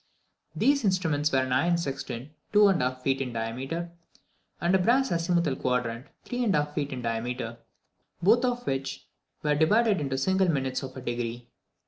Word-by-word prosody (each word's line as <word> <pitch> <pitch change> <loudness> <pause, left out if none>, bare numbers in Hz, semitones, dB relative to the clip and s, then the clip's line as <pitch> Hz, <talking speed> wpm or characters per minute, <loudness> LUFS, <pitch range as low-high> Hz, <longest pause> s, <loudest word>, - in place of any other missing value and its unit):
These 280 -1 +3
instruments 160 -7 +1
were 135 - +2
an 130 - -4
iron 170 +7 +3
sextant, 135 -4 -4 0.2
2½ 170 -12 +3
feet 135 0 +1
in 125 -3 -3
diameter, 130 +10 -3 0.7
and 175 +2 +1
a 190 - +5
brass 250 +7 +3
azimuthal 170 -3 +1
quadrant 125 0 -1 0.2
3½ 195 -12 0
feet 145 -1 -2
in 125 -2 -5
diameter, 115 0 -3 0.6
both 225 +7 +4
of 245 -1 -1
which 135 0 -3 0.4
were 150 -1 +2
divided 205 +6 +3
into 135 -2 -2
single 190 +6 +2
minutes 130 -4 0
of 130 -1 -7
a - - -6
degree. 120 -1 -4
145 Hz, 150 wpm, -27 LUFS, 125-185 Hz, 0.7 s, a